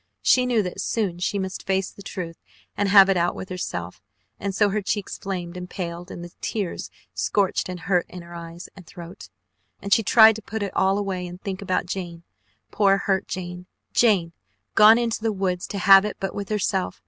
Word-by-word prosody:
She 250 -1 +4
knew 235 -4 +2
that 180 - -5
soon 195 -6 -1
she 180 +3 -1
must 190 -1 -5
face 190 0 0
the - - -14
truth 175 -4 -6 0.4
and 205 -1 0
have 195 -1 +8
it 195 -1 +2
out 175 0 +1
with 190 - -7
herself, 90 - -5 0.4
and 195 -1 -3
so 205 +1 +3
her 210 +2 -1
cheeks 200 0 -3
flamed 180 -3 -5
and 180 0 -7
paled, 175 -1 -6
and 175 - -8
the 175 - -10
tears 200 -6 -3 0.2
scorched 200 -2 0
and 180 -1 -6
hurt 180 -2 +1
in 180 -1 -9
her 170 0 -12
eyes 170 +1 -9
and 185 -4 -14
throat, 170 - -11 0.5
and 200 0 0
she - - +5
tried 220 +1 +7
to - - -9
put 220 0 -4
it 200 - -5
all 190 +1 +2
away 190 -3 -3
and 175 +1 -9
think 190 0 -5
about 185 -2 -1
Jane, 175 -2 -6 0.5
poor 195 -2 +3
hurt 195 -1 -1
Jane. 180 0 -6 0.3
Jane 190 -8 +3 0.4
gone 215 +1 +8
into 235 -2 -1
the 225 0 0
woods 185 -3 -2
to 200 - -5
have 195 +1 +7
it 210 - -4
but 195 - -3
with 200 -1 -5
herself. 195 -3 -1
190 Hz, 205 wpm, -24 LUFS, 180-200 Hz, 0.5 s, have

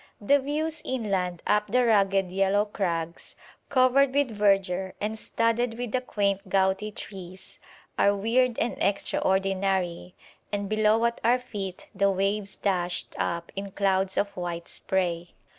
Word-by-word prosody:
The 280 +8 +4
views 305 +3 -2
inland 195 -8 -2
up 210 0 +2
the 250 +4 +2
rugged 195 -4 +3
yellow 195 +2 +2
crags, 170 -5 -3 0.3
covered 260 0 +4
with 285 -4 +2
verdure 195 -3 +1
and 215 +1 -2
studded 230 +1 0
with 245 -2 -4
the 255 - 0
quaint 200 -4 -1
gouty 195 +2 +1
trees, 190 -3 -8 0.4
are 200 0 +4
weird 235 +4 +2
and 235 - -2
extraordinary, 190 -2 0 0.4
and 205 -1 -2
below 215 +2 +3
at 235 0 -1
our 240 +2 +4
feet 200 -7 -6
the 200 0 +2
waves 195 +1 -1
dashed 180 -3 -1
up 170 0 -2
in 195 0 -4
clouds 190 -1 +1
of 200 - 0
white 175 -1 -4
spray. 175 -3 -2
200 Hz, 140 wpm, -27 LUFS, 190-230 Hz, 0.4 s, The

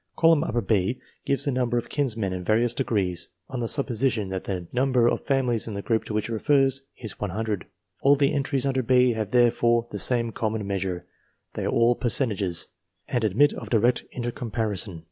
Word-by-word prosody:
Column 165 -2 +5 0.2
B 105 +3 +1 0.3
gives 140 - +1
the 140 - +1
number 125 -1 0
of 120 - 0
eminent - - -14
kinsmen 115 -9 0
in 90 -1 -4
various 115 +4 +2
degrees 100 -9 -1 0.2
on 130 - -4
the 115 - -1
supposition 120 -5 0
that 95 -1 -4
the 90 -3 -4
number 125 -2 +3
of - - -1
families 125 -5 +1
in 105 - -5
the 100 - -4
group 115 -2 0
to - - -5
which 105 - 0
it 115 - -4
refers 135 +3 +2 0.2
is 110 -5 -5
100. 105 0 -3 0.3
All 140 +1 +6
the 140 +2 +2
entries 140 -1 0
under 135 -1 +1
B 125 0 +4
have 110 -3 -3
therefore 120 0 +3
the - - -4
same 120 -2 +2
common 110 -1 -2
measure, 95 -3 -3 0.5
they - - -3
are - - 0
all 115 +1 +4
fercentages, 105 -8 -1 0.4
and 120 -2 0
admit 115 +8 +3
of - - -8
direct 120 +2 +2
intercomparison. 110 -6 -3
115 Hz, 190 wpm, -25 LUFS, 105-130 Hz, 0.5 s, All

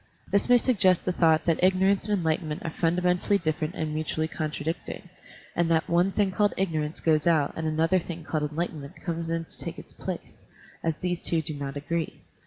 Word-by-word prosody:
This 200 +4 +2
may 245 - +8
sug 245 -3 +1
gest 185 -3 +4
the 180 - +2
thought 160 -3 +3
that 165 0 +1
ignorance 190 +2 +3
and 205 - +3
enlighten 160 -1 0
ment 150 0 -4
are 165 - -2
fundamentally 180 +4 +2
different 155 -1 -2
and 155 -1 -2
mutually 155 0 -1
contradicting, 160 +3 -4 0.5
and 170 -1 +2
that 160 -1 +2
one 175 +3 +3
thing 200 -1 +1
called 205 +2 +2
ignor 165 -5 0
ance 150 +2 -5
goes 155 -1 +2
out 155 -4 +3
and 160 0 -2
another 160 +4 +2
thing 170 -1 -7
called 155 -1 -1
enlighten 160 0 -3
ment 140 +6 -10
comes 165 -2 -3
in 165 0 -1
to - - -4
take - - -5
its - - -11
place, - - -6 0.4
as 165 -2 0
these 175 -1 -2
two 165 -2 +1
do 155 - -4
not 140 -1 -5
agree. 165 +3 -3
165 Hz, 210 wpm, -27 LUFS, 155-180 Hz, 0.5 s, may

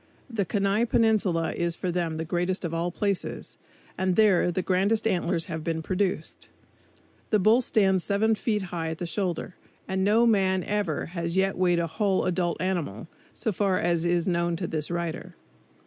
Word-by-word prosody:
The 210 -4 -1
Kenai 200 +5 +1
Peninsula 210 -8 +2
is 170 -1 -1
for 180 - -3
them 170 -2 -2
the 160 - -3
greatest 175 +3 -1
of 165 - -3
all 170 +1 -1
places, 200 +1 -3 0.4
and 185 -1 +1
there 205 -4 +4
the 180 +1 -1
grandest 200 +4 +1
antlers 175 -5 0
have 160 0 -5
been 160 0 -2
produced. 185 +2 -2 0.8
The 215 - +4
bull 215 +5 +4
stands 190 -6 +2
seven 215 +4 +2
feet 210 -1 -1
high 165 -2 -2
at 160 - -4
the 175 - -4
shoulders, 180 0 -3 0.3
and 190 0 -1
no 215 +4 +4
man 190 -5 +2
ever 205 -4 -2
yet 180 +2 +1
has - - -12
weighed 180 -1 +2
a 170 - +1
whole 195 +3 0
adult 175 -1 0
animal, 170 - -3 0.3
so 225 - -1
far 195 -1 +1
as 170 -1 +1
is 175 -1 +1
known 170 -1 0
to 175 - -3
this 155 -2 -3
writer. 170 +1 -4
185 Hz, 180 wpm, -26 LUFS, 170-200 Hz, 0.8 s, there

